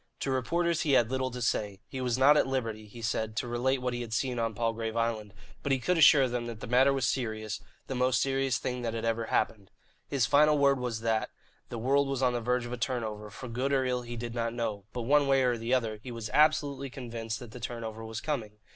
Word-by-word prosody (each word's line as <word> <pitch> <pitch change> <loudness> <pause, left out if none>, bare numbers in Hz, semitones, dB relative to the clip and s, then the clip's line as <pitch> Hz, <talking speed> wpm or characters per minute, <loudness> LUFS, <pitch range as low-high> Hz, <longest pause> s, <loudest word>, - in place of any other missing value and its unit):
To 135 - -1
reporters 170 +6 +1
he 145 - +1
had 120 -2 +4
little 130 0 0
to 125 -1 -5
say. 105 -4 -1
He 130 - -5
was 125 -1 0
not 140 +3 +6
at 150 - +3
liberty, 115 -5 -3
he 115 +2 -11
said, 110 0 -1
to 120 - -2
relate 125 +2 0
what 125 -1 -1
he 120 - -3
had 115 -2 -5
seen 125 +1 -1
on 115 -1 -1
Palgrave 115 0 -2
Island; 115 -3 -1 0.3
but 140 - -2
he 135 - +4
could 180 +8 0
assure 150 -4 +7
them 120 -1 -3
that 115 -2 -6
the - - -6
matter 130 +4 +4
was 135 -2 0
serious, 110 -4 -2 0.3
the - - -4
most 125 0 +2
serious 135 -1 +1
thing 125 -1 -3
that 115 -1 -2
had 115 0 -3
ever 115 0 0
happened. 105 -3 -1 0.4
His 135 -4 +1
final 150 +3 +5
word 140 -1 +4
was 120 -3 -3
that, 115 -1 0 0.4
the 120 - -5
world 135 +4 +2
was 135 -1 -1
on 125 -1 +3
the 120 - -1
verge 125 +1 0
of 120 - -6
a - - -3
turnover, 110 -3 -3
for 115 +5 -8
good 125 +4 -2
or 135 -2 +2
ill 125 -1 0
he 120 0 -7
did 120 0 -5
not 115 -1 -2
know, 110 -4 -3
but, 120 +1 -4
one 145 +3 +4
way 135 -1 +4
or 125 -1 +2
the 115 +1 -4
other, 115 -4 +1
he 125 - -8
was 115 -2 -6
absolutely 145 -3 +3
convinced 115 -3 -5
that 120 -3 -10
the 125 - -9
turnover 115 -2 -5
was 110 0 -5
coming. 115 -9 -3
120 Hz, 250 wpm, -29 LUFS, 115-135 Hz, 0.4 s, assure